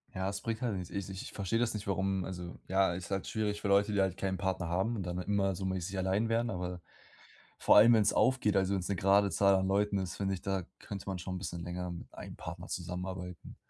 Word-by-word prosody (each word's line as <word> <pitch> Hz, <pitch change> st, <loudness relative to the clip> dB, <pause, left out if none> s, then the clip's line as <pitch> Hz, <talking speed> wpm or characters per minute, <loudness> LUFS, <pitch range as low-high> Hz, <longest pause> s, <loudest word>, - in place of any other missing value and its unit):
Ja, 95 Hz, 0 st, -1 dB
das 100 Hz, 0 st, -3 dB
bringt 115 Hz, +2 st, -3 dB
halt 120 Hz, -5 st, 0 dB
nichts. 90 Hz, -2 st, -5 dB
Ich 100 Hz, -1 st, -4 dB
ich 95 Hz, -1 st, -5 dB
ich -, -, -9 dB
verstehe 100 Hz, +3 st, -1 dB
das 120 Hz, -1 st, +1 dB
nicht, 105 Hz, -1 st, -5 dB
warum 95 Hz, -1 st, 0 dB
also 90 Hz, -2 st, -6 dB
ja, 95 Hz, -1 st, +3 dB
ist 90 Hz, +2 st, -6 dB
halt 95 Hz, 0 st, -1 dB
schwierig 105 Hz, -1 st, -1 dB
für -, -, -2 dB
Leute, 100 Hz, +1 st, +4 dB
die 100 Hz, -, +3 dB
halt 95 Hz, -2 st, 0 dB
keinen 95 Hz, -1 st, -1 dB
Partner 95 Hz, -2 st, -1 dB
haben 95 Hz, +7 st, 0 dB
und 100 Hz, -, -3 dB
dann 90 Hz, 0 st, -3 dB
immer 95 Hz, +1 st, +1 dB
so 95 Hz, -, -4 dB
mäßig 95 Hz, 0 st, -2 dB
allein 95 Hz, +4 st, +1 dB
wären, 115 Hz, +1 st, +1 dB
aber 90 Hz, -2 st, -4 dB, 0.8 s
vor -, -, +5 dB
allem, 110 Hz, +3 st, +9 dB
wenn's 110 Hz, -3 st, +4 dB
aufgeht, 125 Hz, -6 st, +3 dB
also 95 Hz, 0 st, +2 dB
wenn's 90 Hz, -2 st, -2 dB
'ne 100 Hz, -, 0 dB
gerade 100 Hz, +2 st, +4 dB
Zahl 100 Hz, 0 st, +4 dB
an 95 Hz, 0 st, +2 dB
Leuten 100 Hz, +1 st, +2 dB
ist, 90 Hz, -3 st, -3 dB
finde 95 Hz, -1 st, 0 dB
ich, 90 Hz, -, -7 dB
da 95 Hz, -2 st, -1 dB, 0.2 s
könnte 100 Hz, -2 st, -7 dB
man 95 Hz, -2 st, -2 dB
schon 95 Hz, +1 st, -4 dB
bisschen 85 Hz, -2 st, -5 dB
länger 90 Hz, +1 st, -4 dB
mit 85 Hz, -1 st, -8 dB
einem -, -, -8 dB
Partner -, -, -7 dB
zusammenarbeiten. 90 Hz, 0 st, -5 dB
95 Hz, 245 wpm, -32 LUFS, 90-100 Hz, 0.8 s, allem